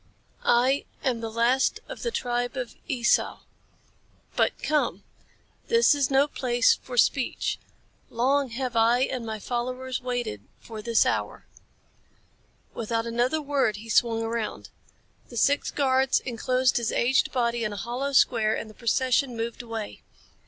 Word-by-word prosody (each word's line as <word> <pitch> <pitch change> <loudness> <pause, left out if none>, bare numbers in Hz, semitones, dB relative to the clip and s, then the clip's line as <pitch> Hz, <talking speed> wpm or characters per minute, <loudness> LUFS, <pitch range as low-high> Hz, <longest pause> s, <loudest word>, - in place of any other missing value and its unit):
"I 255 +4 +3 0.2
am 250 -3 0
the 225 - -3
last 235 +4 +2
of - - -8
the 475 - -1
tribe 245 - -2
of 245 -3 -4
Esau. 250 -6 +1 0.9
But - - +1
come! 300 -1 0 0.6
This 465 -6 +5
is 285 -3 +1
no 275 +1 +4
place 245 -4 +2
for 250 -1 -8
speech. 260 +2 +1 0.5
Long 270 +3 +1
have 250 +1 -4
I 230 +2 +4
and 255 -3 -2
my 220 0 -3
followers 255 +3 -3
waited 245 - -3 0.2
for 220 -2 -9
this 230 0 +3
hour." - - -2 1.3
Without 230 0 -2
another 245 +7 0
word 275 -7 +1
he 220 +3 -10
swung 225 0 +2
around. 225 -1 -4 0.6
The 235 - -8
six 285 +5 +2
guards 265 -1 +2
enclosed 255 +1 +1
his 235 -2 -1
aged 260 +4 +2
body 235 -2 0
in 215 - -1
a 205 - -6
hollow 250 +6 -3
square 225 -5 +3
and 220 - -5
the 215 - -13
procession 250 +2 +1
moved 230 +2 -4
away. 225 -3 -6
245 Hz, 145 wpm, -26 LUFS, 230-265 Hz, 1.3 s, This